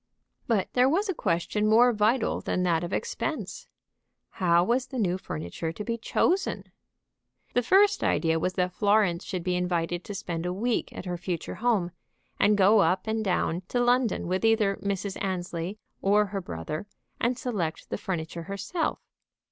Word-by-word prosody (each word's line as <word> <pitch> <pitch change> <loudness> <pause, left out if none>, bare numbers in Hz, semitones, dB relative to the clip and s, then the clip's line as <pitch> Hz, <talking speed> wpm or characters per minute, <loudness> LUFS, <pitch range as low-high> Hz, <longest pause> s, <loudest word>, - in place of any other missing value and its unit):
But 220 -5 +1
there 250 +1 +4
was 390 +8 +1
a - - +1
question 210 - 0
more 235 +3 +6
vital 220 +3 +1
than 180 - -1
that 170 -2 +1
of 175 - -4
expense. 475 - -3 0.6
How 175 -3 +3
was 245 +6 +1
the 265 - -6
new 185 -5 0
furniture 85 - -5
to 210 - -6
be 230 +2 -2
chosen? 350 - 0 0.8
The 245 - +3
first 395 - +4
idea 165 -1 +2
was 185 +3 -1
that 180 0 0
Florence 200 -4 +2
should 180 -3 -4
be 180 0 0
invited 175 -1 -1
to 205 - -7
spend 175 -4 -4
a - - -1
week 230 +5 -1
at - - -8
her 180 -1 -3
future 175 -2 -4
home, 215 -8 +2 0.5
and 210 0 +4
go 205 +2 +6
up 185 +1 +2
and 220 0 -1
down 180 -3 0
to 245 - -1
London 245 -1 +2
with 185 +3 -1
either 220 -3 +3
Mrs. 200 0 -3
Annesley 180 0 -3 0.2
or 210 +2 +4
her 195 -1 -4
brother, 155 - -5 0.3
and 240 +1 +1
select 200 -12 -3
the - - -1
furniture 170 -2 -4
herself. 310 - -2
195 Hz, 170 wpm, -27 LUFS, 175-230 Hz, 0.8 s, more